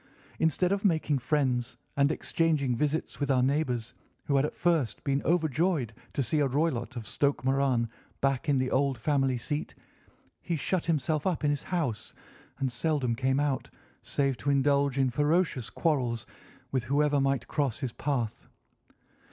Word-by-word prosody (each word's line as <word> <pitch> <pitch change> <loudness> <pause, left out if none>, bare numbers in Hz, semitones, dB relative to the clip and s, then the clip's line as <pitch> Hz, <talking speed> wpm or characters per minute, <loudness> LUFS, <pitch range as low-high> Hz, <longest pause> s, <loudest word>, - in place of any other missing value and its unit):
Instead 160 +3 +2
of 200 0 0
making 160 -7 +2
friends 125 -3 0 0.2
and 140 +1 +3
exchanging 155 -7 +1
visits 150 +5 -1
with 145 -1 -1
our 130 -2 +3
neighbours, 125 -4 0 0.3
who 140 - +1
had 135 +1 +4
at - - -4
first 160 -11 +1
been 140 0 +1
overjoyed 160 - +1 0.2
to 140 - 0
see 150 +6 +1
a 145 - +3
Roylott 130 -3 -1
of 115 -2 -5
Stoke 140 0 0
Moran 135 -3 +2 0.3
back 135 +1 0
in 140 - +4
the 130 0 0
old 135 -1 +2
family 135 +1 +1
seat, 145 +5 -3 0.7
he 170 - -2
shut 170 +4 -1
himself 155 0 0
up 175 -4 -1
in 145 - +3
his 145 - -1
house 155 - -3 0.4
and 135 -2 -1
seldom 135 -2 0
came 130 +3 +1
out 145 -3 -1 0.3
save 140 -3 0
to 140 - -2
indulge 140 -1 +2
in 135 -2 +2
ferocious 150 -3 +1
quarrels 125 - 0 0.5
with 130 -3 0
whoever 145 +2 +2
might 135 -3 0
cross 140 -7 0
his 130 -4 -3
path. 125 -7 -2
140 Hz, 160 wpm, -29 LUFS, 130-150 Hz, 0.7 s, had